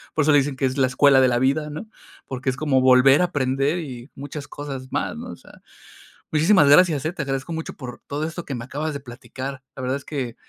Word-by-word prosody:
por 155 - +2
eso 155 - +3
le 145 - +6
dicen 140 0 -2
que 135 - -1
es 130 +1 -1
la 130 -2 +3
escuela 135 +1 +5
de 130 - +5
la 120 -1 +1
vida, 140 +4 +1
¿no?, 155 +9 -7 0.4
porque 130 0 -3
es 130 - -1
como 140 -2 +2
volver 130 +4 +6
a - - +4
aprender 140 +1 0
y 130 -5 -8
muchas 145 +1 -7
cosas 140 -3 -7
más, - - -2
¿no?, - - -7
o - - -8
sea - - -18 0.7
Muchísimas 160 +1 +4
gracias, 155 -2 +5
eh, 160 - -1
te 170 - -4
agradezco 135 +3 -3
mucho 160 0 -5
por 125 -4 -9
todo 145 +2 -3
esto 170 +2 -5
que 140 - -5
me 120 -1 -6
acabas 150 +5 -3
de 140 - -5
platicar. 130 +1 -8
La - - -5
verdad 130 +1 -1
es 140 - -12
que, 130 -6 -4
140 Hz, 245 wpm, -23 LUFS, 130-150 Hz, 0.7 s, le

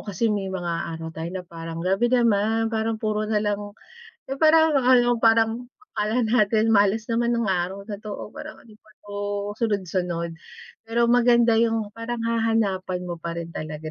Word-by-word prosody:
kasi 230 +4 0
may 195 -2 -2
mga 175 -2 -3 0.2
araw 160 0 -6
tayo 165 +2 -5
na 185 -1 -6
parang 165 0 -7
grabe 195 +6 +2
naman 225 -2 +2
parang 220 0 -1
puro 215 -1 -1
nalang, 205 -1 -1 0.6
eh, 270 - -4
parang 320 0 +5
ano, 245 -1 +4
parang 225 +1 +3 0.3
akala 220 +3 0
natin 220 -1 +2
malas 205 +1 +3
naman 235 +1 +1
ng 235 - 0
araw 185 +2 -2
na 205 -2 -6
'to, 210 -1 -6
o - - -8
parang - - -9
ano 225 - -18
ba 215 - -24
'to, 205 0 -7 0.4
sunod-sunod. 180 -6 -1 0.6
Pero 235 +1 +2
maganda 235 -2 +4
yung 225 -2 +1
parang 230 +1 -5
hahanapan 220 -6 0
mo 175 -1 -5
parin 170 0 -5
talaga 155 0 -6
215 Hz, 165 wpm, -24 LUFS, 185-230 Hz, 0.6 s, parang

